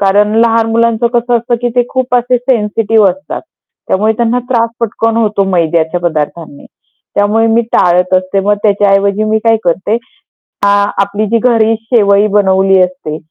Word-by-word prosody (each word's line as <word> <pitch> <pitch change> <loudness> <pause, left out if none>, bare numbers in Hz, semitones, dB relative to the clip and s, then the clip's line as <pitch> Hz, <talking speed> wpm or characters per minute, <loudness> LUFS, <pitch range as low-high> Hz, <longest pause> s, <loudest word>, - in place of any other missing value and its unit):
कारण 205 +2 +2
लहान 230 -1 +2
मुलांचं 230 0 +1
कसं 240 +1 0
असतं 235 +1 -2
की 245 - +1
ते 245 - +4
खूप 255 -1 -2
असे 245 +1 +1
सेन्सिटिव्ह 220 -3 +1
असतात, 190 +1 -6 0.5
त्यामुळे 215 +3 +1
त्यांना 235 +1 0
त्रास 230 -3 +1
पटकन 225 0 -1
होतो 210 -3 0
मैद्याच्या 170 -1 0
पदार्थांनी. 155 -2 -4 0.5
त्यामुळे 210 +2 +1
मी 225 +1 +2
टाळत 180 +1 +2
असते. 185 +1 -1
मग 205 +2 +1
त्याच्या 205 -2 +2
ऐवजी 200 +1 +1
मी 215 0 0
काय 225 0 +3
करते 185 +5 0 0.5
अ, 200 - -4 0.3
आपली 205 +2 -2
जी 230 +3 +1
घरी 225 -2 +2
शेवई 210 -3 +2
बनवली 190 -1 +3
असते, 180 -4 -3
210 Hz, 160 wpm, -11 LUFS, 190-230 Hz, 0.5 s, ते